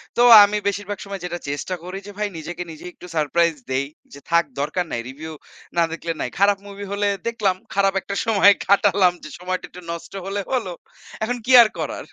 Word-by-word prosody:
তো 240 - +2 0.2
আমি 205 +1 +2
বেশিরভাগ 205 0 -2
সময় 195 -1 -6
যেটা 175 0 -4
চেষ্টা 145 +6 -3
করি 185 +2 -6
যে - - -8
ভাই 210 0 0
নিজেকে 175 +3 -6
নিজে 155 - -11
একটু 180 - -13
সারপ্রাইজ 165 +2 +2 0.2
দেই, 135 +2 0 0.3
যে 140 - -10
থাক 170 -1 +4
দরকার 155 +5 -1
নাই। 120 - -2
রিভিউ 155 +4 -8 0.4
না 170 - +5
দেখলে 165 0 -4
নাই। 125 - -2
খারাপ 200 0 +4
মুভি 200 0 -8
হলে 205 0 0 0.2
দেখলাম 210 -5 0 0.2
খারাপ 195 0 +2
একটা 200 +2 -5
সময় 205 -2 +6 0.2
কাটালাম 195 -2 +4
যে 155 - -8
সময়টা 185 +1 -3
একটু 180 - -12
নষ্ট 170 +3 -8
হলে 195 +1 -3
হলো। 225 -8 -1 0.5
এখন 245 +2 -1
কি 260 - 0
আর 230 - +6
করার? - - -4
185 Hz, 200 wpm, -22 LUFS, 170-200 Hz, 0.5 s, সময়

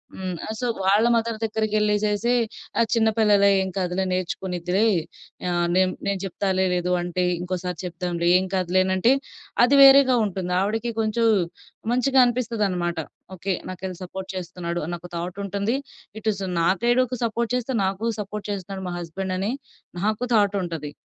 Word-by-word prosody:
హ్మ్. 185 -1 -4
ఆ! - - -6
సో, 250 - -2 0.2
వాళ్ళ 205 +4 +4
మదర్ 230 -1 0
దగ్గరికెళ్ళేసేసి 215 +1 +1 0.5
"ఆ! - - +6
చిన్న 225 -1 +3
పిల్లలే, 205 -2 +5
ఏం 190 - -2
కాదులే, 180 +1 -1
నేర్చుకునిద్దిలే, 185 +2 -1 0.6
ఆహ్, 175 0 +1
నేను 185 0 +3 0.2
నేను 200 -1 0
జెప్తాలే. 190 0 0
లేదు 180 0 -1
అంటే, 175 +1 -1 0.2
ఇంకోసారి 180 -1 -3
చెప్దాంలే. 175 -1 -2
ఏం 190 - -2
కాదులేనంటే," 185 +5 +2 0.5
అది 280 +3 +4
వేరేగా 270 -2 +7
ఉంటుంది. 185 -2 -3
ఆవిడకి 225 +4 -1
కొంచెం 225 +1 +1 0.7
మంచిగా 260 +2 +3
అనిపిస్తనమాట. 210 -8 -1 0.4
ఓకే. 190 +2 -2
నాకెళ్ళి 185 0 -6
సపోర్ట్ 190 +1 -7
చేస్తున్నాడు 175 -1 -4
అనొక 175 0 -6
థాట్ 175 +2 -4
ఉంటుంది. 200 +4 -1 0.4
ఇటుస్ 215 -3 -1 0.2
నా 165 - +2 0.2
సైడుకు 245 +1 +2
సపోర్ట్ 235 0 -1
చేస్తూ 250 +1 -2
నాకు 195 +3 -2
సపోర్ట్ 210 0 -5
చేస్తున్నాడు 195 -1 -5
మా - - -3
హస్బెండని 185 +4 -3 0.5
నాకు 215 +3 0
థాట్ 205 -2 +3
ఉంటది. 160 -4 -5
195 Hz, 140 wpm, -24 LUFS, 180-220 Hz, 0.7 s, వేరేగా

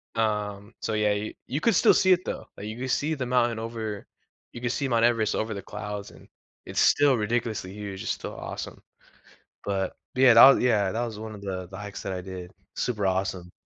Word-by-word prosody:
Um, 105 -1 -1
so 110 - -2
yeah, 105 -1 +2
you, 105 +1 -3
you 145 +4 -2
could 230 -4 +3
still - - +6
see 190 - +4
it 180 0 -1
though, - - -5
like, 100 - -7
you 110 - -6
could 130 0 -3
see 150 +5 +1
the 130 - -3
mountain 120 -2 +2
over 110 -2 -5 0.5
you 120 - -7
can 120 - -1
see 140 0 -1
Mount 115 -2 +3
Everest 115 -2 +2
over 110 0 -2
the 100 - -5
clouds 105 -1 -6
and - - -16 0.4
it's - - -3
still 145 -3 +5
ridiculously 110 -3 -2
huge, 100 -2 -6
it's - - -1
still - - -7
awesome. - - -7 0.8
But 95 -2 -1 0.2
yeah, 130 -2 +7
that 115 - +9
wa 135 - +10
yeah 105 -6 +2
that 115 +4 -1
was 110 -3 -7
one 110 -1 -7
of 100 - -11
the, 95 -2 -4
the 95 - -9
hikes 105 0 -7
that 100 - -3
I 90 - -4
did, 90 -1 -8 0.3
super 105 -5 -1
awesome. 95 -1 -1
110 Hz, 220 wpm, -26 LUFS, 100-120 Hz, 0.8 s, wa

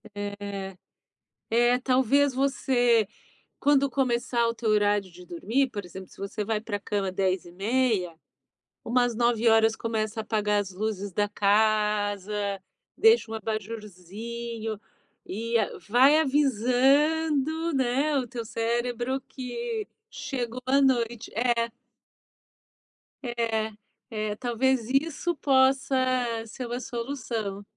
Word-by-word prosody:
É. 200 -2 -5 0.7
É, 240 +2 +4
talvez 265 +2 +3
você 245 -4 +2 0.5
quando 280 -1 +3
começar 240 -2 +1
o 230 - 0
teu 225 -1 -2
horário 205 -3 +2
de 180 +1 -13
dormir, 225 +11 0
por 205 -3 -5
exemplo, 185 +2 -9
se - - -18
você 200 +1 -4
vai 215 -1 -1
pra 205 -2 -4
cama 200 -2 -2
22h30, 190 +2 0 0.7
umas 245 0 +1
21h 225 -1 +3
começa 220 -1 -2
a - - -2
apagar 210 -1 +1
as 195 -2 -7
luzes 205 0 -3
da 205 +3 0
casa. 210 -1 +1 0.6
Deixa 450 - +5
um - - -3
abajurzinho 220 +1 -5 0.5
e 230 +4 -4 0.3
vai 265 +7 +6
avisando, 290 +4 +2
né, 270 +3 +1
o 255 -2 -1
teu 235 0 -5
cérebro 240 +3 -2
que 400 - -5 0.2
chegou 260 - -4
a 275 +2 +3
noite. 240 -3 +1
É. 235 0 +1 1.5
É, 230 -3 -1 0.4
é, 215 -1 -3
talvez 245 0 0
isso 315 +5 0
possa 270 -1 +3 0.5
ser 250 +3 -6
uma 240 +1 -3
solução. 230 -5 -4
235 Hz, 110 wpm, -27 LUFS, 210-265 Hz, 1.5 s, vai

